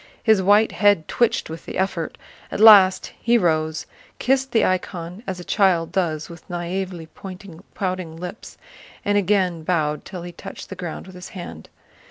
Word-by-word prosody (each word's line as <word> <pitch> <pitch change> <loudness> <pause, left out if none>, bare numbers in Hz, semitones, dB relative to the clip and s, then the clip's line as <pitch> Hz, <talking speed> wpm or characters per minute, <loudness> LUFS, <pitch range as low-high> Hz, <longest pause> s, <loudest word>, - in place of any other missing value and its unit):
His 220 -4 +4
white 205 +3 +4
head 205 -6 +3
twitched 240 -2 +1
with 160 +1 -9
the - - -5
effort. 185 -4 -2 0.3
At - - -4
last 200 -4 +7
he 235 +1 +4
rose, 160 -5 0 0.3
kissed 265 +1 +1
the 225 - +3
icon 180 0 -3
as 185 -2 -4
a - - -7
child 175 -5 +2
does 165 -5 -1
with 170 -1 -13
naïvely 175 -1 -4 0.7
pouting 185 -4 -3
lips, 180 +5 -8 0.5
and 205 - +2
again 190 -4 +2
bowed 155 -3 0
till 180 -3 -8
he 175 - -7
touched 175 - -10
the 190 - -6
ground 175 -3 -6
with 185 - -12
his 180 +1 -9
hand. 80 - -8
180 Hz, 165 wpm, -22 LUFS, 165-200 Hz, 0.7 s, last